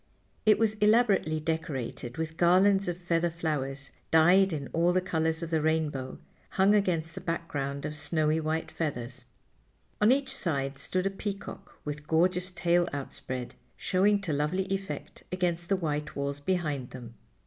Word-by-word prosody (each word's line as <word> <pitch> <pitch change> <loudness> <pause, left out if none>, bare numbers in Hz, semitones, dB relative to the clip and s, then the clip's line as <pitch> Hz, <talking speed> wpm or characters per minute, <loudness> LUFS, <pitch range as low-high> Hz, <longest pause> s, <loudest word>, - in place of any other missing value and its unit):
It 215 - +7
was 220 -1 +2
elaborately 210 -7 +4
decorated 145 -6 -3
with 160 0 -3
garlands 190 +3 +4
of 175 -1 -2
feather 170 -1 0
flowers 140 -5 -3 0.2
dyed 180 +4 +5
in 145 -4 -3
all 170 +2 +3
the 185 - +4
colors 160 -2 -1
of 165 - -5
the 160 -1 +2
rainbow, 150 -4 -1 0.3
hung 195 +2 +4
against 170 -5 +1
a - - -4
background 145 -5 -3
of 155 0 -4
snowy 155 +1 0
white 160 +1 -2
feathers. 125 -5 -4 0.8
On 210 +3 +6
each 270 0 +1
side 135 -5 -1
stood 185 +6 -1
a 195 - +1
peacock 195 -1 -6
with 150 0 -5
gorgeous 180 +3 +2
tail 175 -1 +2
outspread, 130 -2 -5 0.2
showing 200 +2 +2
to 175 -6 -2
lovely 150 +6 0
effect 195 0 -5
against 175 -2 -1
the 195 - +4
white 150 -4 -3
walls 140 0 -2
behind 150 -6 -1
them. 120 -3 -9
165 Hz, 155 wpm, -29 LUFS, 150-185 Hz, 0.8 s, It